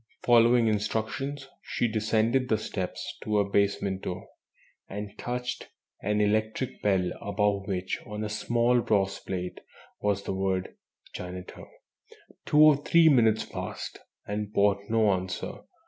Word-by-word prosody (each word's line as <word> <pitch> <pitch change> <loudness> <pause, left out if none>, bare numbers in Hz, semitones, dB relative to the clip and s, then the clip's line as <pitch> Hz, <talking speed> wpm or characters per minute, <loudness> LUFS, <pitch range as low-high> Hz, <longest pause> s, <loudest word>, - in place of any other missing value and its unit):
Following 120 0 +5
instructions, 110 +6 -2
she 120 - -1
descended 110 +3 +1
the 110 - +3
steps 95 -3 -5
to 105 -1 0
a 100 -1 +2
basement 100 -1 +1
door, 90 +1 -6 0.6
and 105 0 -6
touched 125 0 -4 0.3
an 105 0 0
electric 110 +4 0
bell 95 -3 +2
above 100 -1 0
which, 95 -2 -2
on 105 0 -4
a - - -1
small 120 +3 +2
brass 100 -3 +1
plate, 90 -2 -5 0.4
was 100 -1 0
the - - -3
word 95 -1 -1 0.4
"Janitor." 90 0 -8 0.8
Two 150 - +5
or 155 -2 +8
three 165 +3 +5
minutes 115 -6 +4
passed, - - -6 0.3
and 105 0 -3
brought 100 -1 +2
no 110 -2 +3
answer. 95 0 -4
105 Hz, 130 wpm, -28 LUFS, 100-115 Hz, 0.8 s, or